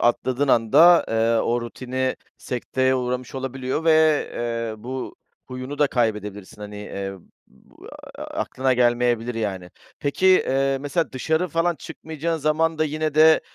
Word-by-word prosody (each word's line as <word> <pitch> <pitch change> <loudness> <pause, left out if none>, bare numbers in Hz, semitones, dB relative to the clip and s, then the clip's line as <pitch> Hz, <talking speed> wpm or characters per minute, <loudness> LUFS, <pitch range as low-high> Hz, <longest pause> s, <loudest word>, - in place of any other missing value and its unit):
atladığın 130 +3 +1
anda, 160 +11 +6
eee, 115 0 +2
o 120 +1 0
rutini 130 +2 -3 0.2
sekteye 130 +1 -1
uğramış 125 -1 -3
olabiliyor 130 +3 -3
ve, 165 - +4 0.4
eee, 115 -1 -3
bu 130 +1 -5 0.3
huyunu 130 +3 -6
da 150 - +4
kaybedebilirsin. 105 -5 -3
Hani, 105 0 -8
eee, 100 -1 -5 0.3
b - - -25 0.4
eee, - - -5
aklına 130 0 -1
gelmeyebilir, 120 -1 +1
yani. 95 -5 -4 0.3
Peki, 145 +6 0
eee, 135 -7 +3
mesela 145 +4 -1
dışarı 160 +7 0
falan 165 +2 +1
çıkmayacağın 160 +1 -5
zaman 155 +2 +1
da 155 - +3
yine 155 0 -2
de, 155 +1 +6
130 Hz, 135 wpm, -23 LUFS, 115-155 Hz, 0.4 s, anda